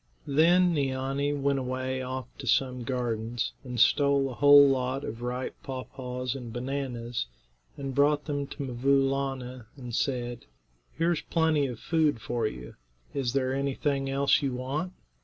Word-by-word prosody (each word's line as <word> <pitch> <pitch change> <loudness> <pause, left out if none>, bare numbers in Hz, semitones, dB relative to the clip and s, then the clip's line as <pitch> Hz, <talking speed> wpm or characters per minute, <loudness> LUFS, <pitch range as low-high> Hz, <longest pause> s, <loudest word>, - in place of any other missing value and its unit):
Then 170 +5 +4
Neeanee 135 0 0
went 140 0 +1
away 130 0 -2
off 130 0 -4
to 130 - -7
some 125 +1 +2
gardens 120 -2 -2
and 125 -2 -5
stole 140 +2 +4
a - - -6
whole 145 +2 +8
lot 130 0 0
of 115 - -6
ripe 125 +1 -3
paw 130 -2 -5
paws 125 -1 -4
and 125 -4 -7
bananas, 125 - -3 0.5
and 135 -1 -4
brought 145 +2 +3
them 145 -2 -2
to 140 - -6
'Mvoo 135 +2 +2
Laana, 130 -3 -3
and 125 -3 -8
said: 120 -1 -2 0.5
"Here's 165 0 +1
plenty 160 -3 +1
of 120 -3 -6
food 155 -6 +1
for 115 -1 -1
you. 60 - -8 0.4
Is 130 -3 -1
there 130 -1 +1
anything 140 0 -1
else 140 +2 +3
you 135 -3 -1
want? 145 +8 -3
135 Hz, 155 wpm, -28 LUFS, 125-140 Hz, 0.5 s, whole